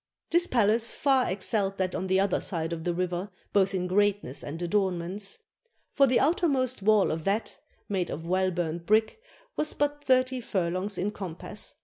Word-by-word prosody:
This 345 +1 +5
palace 230 -1 +2
far 270 -3 +2
excelled 195 +1 -1
that 185 -1 -1
on 190 - -3
the 190 0 +2
other 195 -1 +1
side 165 -2 -3
of 160 -1 -6
the 175 - 0
river 180 +2 -2 0.2
both 195 -1 +3
in 180 -1 -1
greatness 200 -6 0
and 155 +3 -6
adornments. 190 +1 -1 0.5
For 275 - +4
the 250 -1 +3
outer 350 +2 +2
most 255 -5 0
wall 210 0 +4
of 160 0 -3
that 205 +3 -1 0.3
(made 190 -3 -1
of 160 +3 -5
well 185 +2 +1
burnt 170 -1 -3
brick) 220 - +2 0.3
was 305 - 0
but 290 0 -1
thirty 255 -1 +2
furlongs 190 -1 -2
in 200 +3 -1
compass. 195 +1 -6
195 Hz, 175 wpm, -28 LUFS, 180-230 Hz, 0.5 s, This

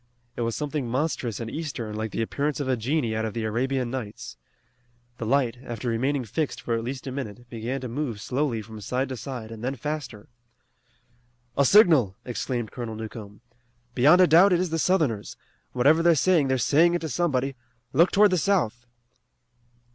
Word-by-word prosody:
It - - -4
was 115 -1 -1
something 150 -4 -3
monstrous 130 -4 -2
and 115 - -4
eastern, 130 -6 -5
like 110 +1 -3
the 115 - -2
appearance 145 +6 -2
of 140 - -2
a 130 - +2
genie 120 -1 -1
out 110 - -1
of 110 -1 -4
the 115 - -2
Arabian 125 +3 -1
Nights. 125 -6 -6 0.8
The 115 - -3
light, 130 -2 +1
after 120 0 -5
remaining 130 +3 0
fixed 145 +8 -2
for 120 - -3
at 115 0 -1
least 130 +3 -5
a 135 - -4
minute, 120 -3 -6
began 120 +3 -4
to 130 - -4
move 120 -3 -3
slowly 125 -1 -1
from 110 0 -10
side 130 +5 -2
to 130 - -4
side 115 -1 -7
and 115 0 -9
then 130 +2 -2
faster. 135 -5 -5 1.3
"A 140 - +3
signal!" 155 - +5
exclaimed 120 -2 -3
Colonel 115 -3 -5
Newcomb. 110 -1 -8 0.5
"Beyond 150 +9 +6
a - - +8
doubt 180 +4 +6
it 175 - +3
is 180 -2 -1
the 165 - 0
Southerners. 150 - 0 0.4
Whatever 145 +6 +4
they're 170 0 +5
saying 160 -1 +3
they're 130 0 +1
saying 160 +8 +4
it 175 - -1
to 160 - -3
somebody. 135 -3 0 0.4
Look 170 +6 +5
toward 205 0 +5
the 185 - +2
south!" 120 - 0
130 Hz, 185 wpm, -25 LUFS, 115-150 Hz, 1.3 s, a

